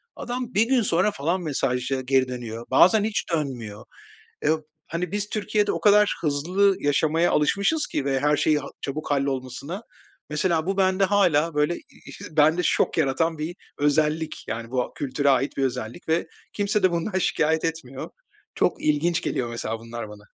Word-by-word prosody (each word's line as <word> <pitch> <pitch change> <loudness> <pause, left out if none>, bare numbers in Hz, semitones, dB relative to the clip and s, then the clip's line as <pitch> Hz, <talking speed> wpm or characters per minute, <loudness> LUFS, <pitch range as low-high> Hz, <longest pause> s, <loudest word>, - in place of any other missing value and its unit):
Adam 250 0 -5
1 210 - +4
gün 260 -1 +3
sonra, 190 0 +2
falan, 170 +2 -1
mesaja 135 -4 -1
geri 130 0 +2
dönüyor, 120 -2 -6
bazen 205 +4 +6
hiç 215 0 -1
dönmüyor. 120 -9 -3 0.6
Eee, 150 - +4
b - - +4 0.4
hani, 170 +1 -3
biz 205 0 -2
Türkiye'de 210 -1 0
o - - -3
kadar, 210 0 +5
hızlı 180 +7 +2
yaşamaya 155 +4 +2
alışmışız 200 - +2
ki 140 - -2
ve 135 -1 0
her 145 +1 +3
şeyi, 155 0 +2
ha 140 - -7
çabuk 150 +3 -5
hallolmasına, 140 - -2 0.5
mesela, 160 +1 0
bu 195 +1 -1
bende 190 0 +3
hâlâ 175 -5 +3
böyle 150 +3 +2
ı 160 - -12
bende 155 +3 +5
şok - - +1
yaratan 160 +4 +1
bir 155 +3 -4 0.2
özellik, 150 +2 0
yani, 115 0 -4
bu, 130 0 +1
a - - -8
kültüre 140 +1 0
ait 135 +1 +1
bir 135 - +1
özellik 120 +3 -4
ve 160 +1 +1 0.3
kimse 205 0 0
de 185 - +5
bundan 170 +3 -1
şikâyet 160 -3 +1
etmiyor. 160 -5 -4 0.4
Çok - - 0
ilginç 165 +3 +2
geliyor, 120 - -2
mesela, 115 -1 -4
bunlar 115 -1 -7
bana. 105 0 -12
155 Hz, 170 wpm, -24 LUFS, 135-185 Hz, 0.6 s, bazen